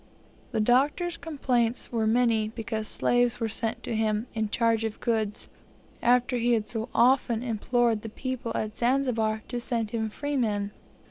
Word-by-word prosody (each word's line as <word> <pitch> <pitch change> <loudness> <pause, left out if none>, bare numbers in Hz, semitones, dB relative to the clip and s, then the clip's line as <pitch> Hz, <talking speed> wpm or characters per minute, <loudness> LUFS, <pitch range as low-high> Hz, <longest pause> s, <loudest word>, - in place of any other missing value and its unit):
The - - -1
Doctor's 285 +10 +2
complaints 250 -7 -1
were 225 -2 +1
many 225 -2 +3
because 220 -1 -4
slaves 245 +1 +2
were 225 - 0
sent 225 +1 -3
to - - -3
him, 215 0 0
in 220 -2 -1
charge 230 0 +2
of 220 -1 -3
goods, 220 -3 -1 0.5
after 245 +1 +3
he 240 +1 +2
had 220 -2 +1
so 225 +1 -4
often 240 -1 +3
implored 235 -1 +1
the 225 - -6
people 255 0 -4
at 215 -1 -2
Zanzibar 235 -4 +1
to 245 - -3
send 230 -3 -2
him 220 -2 -1
freemen. 215 -6 -1
230 Hz, 155 wpm, -27 LUFS, 220-245 Hz, 0.5 s, many